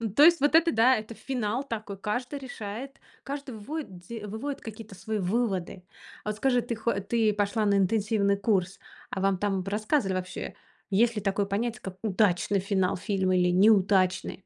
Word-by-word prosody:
То 290 - +7
есть, 340 -1 +7
вот 290 +3 +3
это 335 0 +5
да, 250 +2 +5
это 215 +1 -7
финал 245 0 -2
такой, 215 -6 -5
каждый 245 +8 -3
решает, 245 +1 -7 0.2
каждый 275 -3 -6
выводит 215 - -6
де 225 -3 -6
выводит 270 +7 -5
какие-то 220 -2 -9
свои 215 +4 -3
выводы. 190 -2 -1 0.4
А 210 - -3
вот 210 - -3
скажи, 245 0 +2
ты 235 0 -4
хо 230 +1 -1
ты 220 +1 +1
пошла 210 +1 0
на 200 - +3
интенсивный 200 0 +2
курс, 195 -3 0 0.3
а 190 - -4
вам 195 -1 +2
там 195 -1 0
рассказывали 210 +1 0
вообще, 185 0 -5 0.3
есть 230 +4 +3
ли - - -1
такое 200 0 0
понятие, 225 +4 -2
как 190 -1 -7
удачный 200 -2 +2
финал 190 -1 0
фильма 190 -1 0
или 180 0 +3
неудачный? 190 -1 +3
210 Hz, 175 wpm, -27 LUFS, 195-235 Hz, 0.4 s, То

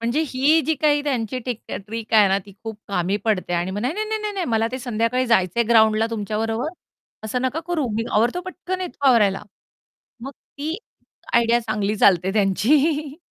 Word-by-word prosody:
म्हणजे, 235 +6 0
ही 285 +6 +3
जी 320 - +2
काही 295 0 +2
त्यांची 255 -4 -2
टिक 240 -3 -3 0.3
ट्रिक 225 +1 -7
आहे 210 -2 +6
ना 195 +1 +2
ती 200 - -13
खूप 220 -2 -6
कामी 190 0 0
पडते. 205 -5 0
आणि 175 +1 -1
मग, 200 +2 -4
"नाही-नाही, 320 - -2
नाही-नाही, 425 -1 -2
नाही, 375 -3 -2
मला 225 -1 +1
ते 255 - -3
संध्याकाळी 245 +1 -1
जायचंय 230 -1 +2
ग्राउंडला 220 -1 +4
तुमच्याबरोबर. 225 +3 -2 0.6
असं 245 +3 -2
नका 260 +5 -1
करू. 330 -6 -1
मी 225 - -1
आवरतो 235 +11 +1
पटकन. 370 0 -5
येतो 345 -6 -3
आवरायला." 210 -6 +3 0.8
मग 270 +3 -6
ती 300 +4 -7 0.6
आयडिया 235 0 +4
चांगली 215 -2 -2
चालते 190 -2 +3
त्यांची. 280 - +1
230 Hz, 170 wpm, -22 LUFS, 215-285 Hz, 0.8 s, आहे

